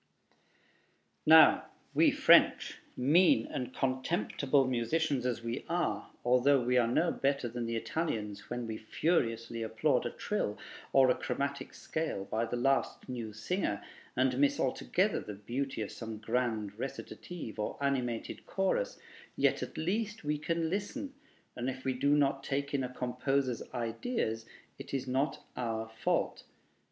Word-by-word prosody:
Now, 160 0 +8 0.3
we - - +5
French, - - +5 0.2
mean 145 -1 +5
and 125 -1 -4
contemptible 135 +1 +1
musicians 130 +2 0
as 120 -2 -2
we 115 +2 -3
are, 165 -12 -1 0.2
although 125 +3 +5
we 125 +1 +1
are 120 - +3
no 160 +8 +2
better 140 -2 0
than 120 0 -4
the 115 - -2
Italians 105 -7 -3
when 120 0 -3
we 110 -1 -4
furiously 115 -3 0
applaud 110 -1 +1
a - - -2
trill - - -2 0.3
or 130 -2 +6
a - - +2
chromatic 140 -1 -3
scale 155 -11 -3
by 110 +3 -1
the 115 - -3
last 135 +3 +1
new 120 -4 -4
singer, 105 - -2 0.3
and 130 0 +2
miss 140 0 +3
altogether - - +1
the 105 - -7
beauty 125 +4 -3
of 105 - -6
some 115 -2 -6
grand 110 -2 -1
recitative 135 -1 -6
or 105 - -2
animated 125 -5 -2
chorus, 195 - 0 0.4
yet - - +2
at - - -6
least 210 +5 -1
we 150 0 -1
can 165 +1 0
listen, 205 +8 -3 0.4
and 125 +2 -2
if 130 0 -7
we 130 - +1
do 140 +3 +3
not 135 -1 +2
take 140 +1 -2
in 135 -2 +1
a 125 - -3
composer's 125 0 -1
ideas 115 - -2 0.3
it - - -5
is 130 -1 -2
not 135 +3 -1
our 115 -2 -2
fault. 110 0 -1
125 Hz, 145 wpm, -32 LUFS, 115-140 Hz, 0.4 s, Now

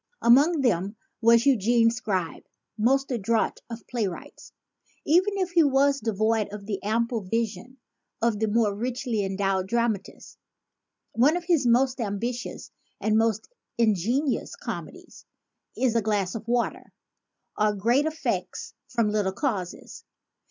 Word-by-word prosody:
Among 280 +7 +5
them 200 -4 0 0.3
was 230 +1 +5
Eugene 235 -2 +4
Scribe, 195 -8 -3 0.3
most 270 +5 +1
adroit 230 -1 0
of 230 -1 -8
play 235 -5 -1
wrights 180 - -10 0.5
even 370 +6 +3
if 370 -2 -1
he 340 -2 +5
was 280 0 +3
devoid 220 -1 0
of 205 -1 -8
the 200 -2 -4
ample 230 +2 -1
vision 230 +5 -3 0.4
of 230 -2 0
the 220 - +1
more 215 -1 +2
richly 240 0 -2
endowed 195 -1 -1
dramatists. 230 -3 -3 0.7
One 280 +9 +3
of 355 - -5
his 330 -7 +2
most 255 +2 +3
ambitious 230 +3 -4 0.3
and 215 0 +1
most 220 -1 +1 0.3
ingenious 235 - 0
comedies - - -8 0.5
is 250 -3 +1
*A 230 - +3
Glass 205 -3 -1
of 225 0 -7
Water; 240 0 -2 0.6
or 210 0 +1
Great 240 +9 +2
Effects 315 0 -3
from 235 -3 0
Little 205 -3 0
Causes. 200 - -4
230 Hz, 130 wpm, -26 LUFS, 210-255 Hz, 0.7 s, Among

